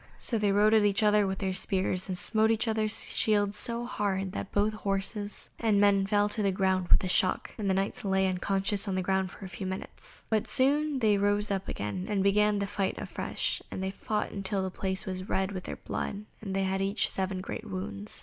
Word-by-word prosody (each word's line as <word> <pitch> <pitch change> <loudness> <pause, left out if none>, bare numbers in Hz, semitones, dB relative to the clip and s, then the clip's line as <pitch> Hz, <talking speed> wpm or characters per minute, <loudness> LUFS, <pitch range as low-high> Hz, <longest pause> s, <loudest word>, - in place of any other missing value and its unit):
So 230 - +1
they 205 -1 +2
rode 210 +2 +4
at 220 -1 +5
each 205 +1 +2
other 210 -1 +4
with 190 0 -2
their 190 -1 -2
spears, 185 0 0
and 185 - -2
smote 215 +4 +3
each 225 +1 +2
other's 220 -1 +1
shields 205 -2 +2
so 235 +3 +1
hard 195 -5 -2
that 195 - -5
both 205 +1 +1
horses 205 0 -3
and 215 -3 +2
men 200 -1 +4
fell 205 0 +3
to 215 - -1
the 200 -1 +2
ground 185 -1 +1
with - - +5
the 185 - -2
shock, 185 0 +2
and 205 -3 -2
the 190 - +2
Knights 195 +1 -2
lay 190 -1 +2
unconscious 195 +2 0
on 195 - -1
the 185 - 0
ground 190 0 0
for 190 +1 -9
some 185 +1 -5
minutes. 190 - -6
But 220 -2 0
soon 290 +2 +3
they 215 -5 +3
rose 205 +1 +1
up 195 -1 -2
again 105 - -4
and 200 -2 +1
began 210 +1 +3
the 200 - -1
fight 200 -1 -2
afresh, - - -3
and 190 - -5
they 190 - -2
fought 210 +2 -3
till 195 -1 0
the 190 - -3
place 190 0 -1
was 185 0 -5
red 190 +1 0
with 185 -2 -6
their - - -5
blood, 205 +1 -5 0.2
and 195 -3 -4
they 195 - +1
had 190 0 -1
each 200 +2 +1
seven 190 -1 -1
great 185 - -6
wounds. 100 +2 -3
195 Hz, 225 wpm, -29 LUFS, 190-210 Hz, 0.2 s, at